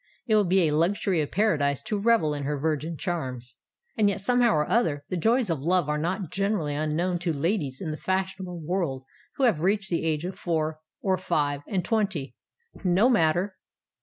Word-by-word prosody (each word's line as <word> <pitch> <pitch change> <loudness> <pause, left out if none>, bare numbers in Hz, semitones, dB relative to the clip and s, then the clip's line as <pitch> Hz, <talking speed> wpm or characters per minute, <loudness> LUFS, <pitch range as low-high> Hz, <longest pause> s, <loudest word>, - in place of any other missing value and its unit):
It 225 - 0
will 210 -1 +4
be 180 -1 +3
a 150 - 0
luxury 175 +1 +1
of 145 - -3
paradise 150 -9 +1
to 210 - -2
revel 205 -8 +3
in 145 - -4
her 145 +1 -2
virgin 155 +2 -2
charms. 130 - -4 0.4
And 210 -2 +3
yet, 200 - -2
somehow 245 +3 +3
or 150 0 +1
other, 150 -12 +1
the - - -2
joys 225 +3 +2
of 160 - -1
love 175 +2 +1
are 150 0 0
not 175 +2 -2
generally 195 -6 0
unknown 155 +4 -1
to 175 -1 -1
ladies 150 -3 -1
in 165 -5 -4
the 155 - -4
fashionable 190 -1 -2
world 160 -6 -2 0.3
who 275 - -1
have 220 -12 +3
reached 195 +2 +1
the 170 - 0
age 160 0 0
of 185 - -4
four 155 -3 -2 0.2
or 190 -2 +1
five 145 -5 0
and 185 -3 -1
twenty. 205 - -1 0.5
No 190 +6 +4
matter! 180 -1 +2
175 Hz, 190 wpm, -26 LUFS, 150-195 Hz, 0.5 s, will